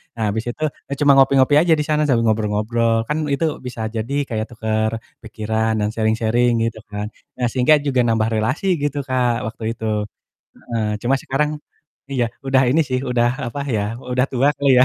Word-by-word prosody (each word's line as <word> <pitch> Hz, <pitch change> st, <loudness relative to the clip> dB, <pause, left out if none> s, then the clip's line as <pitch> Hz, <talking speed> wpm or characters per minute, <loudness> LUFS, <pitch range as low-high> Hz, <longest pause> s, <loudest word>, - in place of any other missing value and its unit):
Nah 110 Hz, -, -3 dB
habis 110 Hz, +2 st, -2 dB
itu 155 Hz, -, -7 dB, 0.3 s
ya -, -, -2 dB
cuma 145 Hz, -1 st, +5 dB
ngopi-ngopi 135 Hz, +1 st, +5 dB
aja 165 Hz, -1 st, +4 dB
di -, -, +1 dB
sana 150 Hz, 0 st, +2 dB
sambil 120 Hz, -4 st, +2 dB
ngobrol-ngobrol, 110 Hz, +2 st, +1 dB
kan 150 Hz, -, 0 dB, 0.2 s
itu 160 Hz, +4 st, +1 dB, 0.2 s
bisa 120 Hz, -2 st, -5 dB
jadi 115 Hz, +5 st, -3 dB, 0.2 s
kayak 110 Hz, -1 st, -2 dB
tukar 110 Hz, -1 st, 0 dB, 0.3 s
pikiran 110 Hz, 0 st, -1 dB
dan 105 Hz, -, +1 dB
sharing-sharing 115 Hz, +2 st, +2 dB, 0.2 s
gitu 110 Hz, -1 st, -6 dB
kan. 105 Hz, 0 st, -4 dB, 0.3 s
Nah 125 Hz, -, +2 dB
sehingga 130 Hz, +4 st, +4 dB
juga 135 Hz, -3 st, +1 dB
nambah 110 Hz, -1 st, +2 dB
relasi 120 Hz, -, -1 dB, 0.2 s
gitu 145 Hz, 0 st, -1 dB
Kak 125 Hz, -2 st, +2 dB, 0.2 s
waktu 115 Hz, 0 st, -8 dB
itu, 110 Hz, -, -7 dB, 0.7 s
heeh, 115 Hz, -2 st, -4 dB, 0.2 s
cuma 125 Hz, +3 st, +2 dB
sekarang 150 Hz, +3 st, 0 dB, 0.6 s
iya, 125 Hz, -3 st, +1 dB, 0.2 s
udah 135 Hz, 0 st, +4 dB
ini 160 Hz, -, +3 dB
sih, 130 Hz, -1 st, 0 dB
udah 120 Hz, -1 st, +3 dB, 0.2 s
apa 145 Hz, -, -5 dB, 0.2 s
ya, 100 Hz, -, 0 dB, 0.3 s
udah 125 Hz, 0 st, +2 dB
tua 130 Hz, +3 st, +3 dB
kali 140 Hz, -1 st, +2 dB
ya. 130 Hz, -, +7 dB
120 Hz, 180 wpm, -20 LUFS, 110-135 Hz, 0.7 s, ya